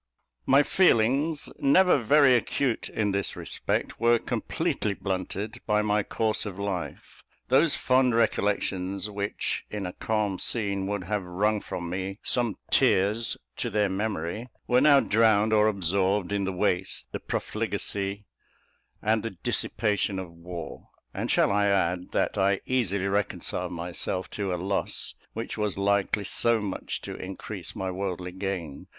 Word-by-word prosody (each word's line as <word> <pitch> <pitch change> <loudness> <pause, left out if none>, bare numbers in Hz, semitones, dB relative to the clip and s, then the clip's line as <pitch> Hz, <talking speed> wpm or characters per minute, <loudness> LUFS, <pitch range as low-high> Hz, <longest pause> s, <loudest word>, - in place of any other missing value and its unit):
My 140 +2 +6
feelings, 145 -1 +2
never 180 +3 +5
very 140 +2 +5
acute 125 +1 0
in 105 -2 0
this 100 0 -1
respect, - - -2
were 120 0 +5
completely 105 -2 -2
blunted 95 +3 -4
by 105 0 +3
my 105 0 +2
course 110 +1 -1
of 100 -3 -6
life. 100 -3 -5 0.3
Those 140 +4 +4
fond 130 -2 +3
recollections 100 -3 0
which, 100 0 -2
in 105 -2 -4
a 90 - -4
calm 105 -4 -1
scene, 100 -4 +2
would 100 -2 -2
have 105 +3 -1
wrung 100 +4 0
from 85 -1 -5
me 95 +2 -4
some 120 -4 +1 0.2
tears 105 +5 +3 0.2
to 120 - -1
their 105 -2 +1
memory, 100 +2 -3 0.2
were 125 +1 +3
now 140 -1 +7
drowned 110 0 +3
or 105 0 +5
absorbed 95 0 +1
in 100 -1 0
the 95 - -1
waste, 90 0 -1
the - - -4
profligacy, 100 +1 -3 0.8
and 110 +1 +2
the 115 - -3
dissipation 105 -2 0
of 95 -2 -5
war; 85 -1 -8 0.2
and - - -3
shall - - +3
I 100 0 +3
add, 90 -2 +1
that - - 0
I 95 0 +2
easily 100 -7 0
reconciled 100 -2 -2
myself 90 +2 -3
to 100 -2 -2
a - - 0
loss 95 +3 -1 0.2
which - - -5
was 105 -2 -1
likely 100 +1 +1
so 115 +3 +2
much 100 -3 -4
to - - -5
increase - - -6
my 95 -1 -3
worldly 90 -1 -4
gain. 90 -6 -5
100 Hz, 145 wpm, -27 LUFS, 95-110 Hz, 0.8 s, now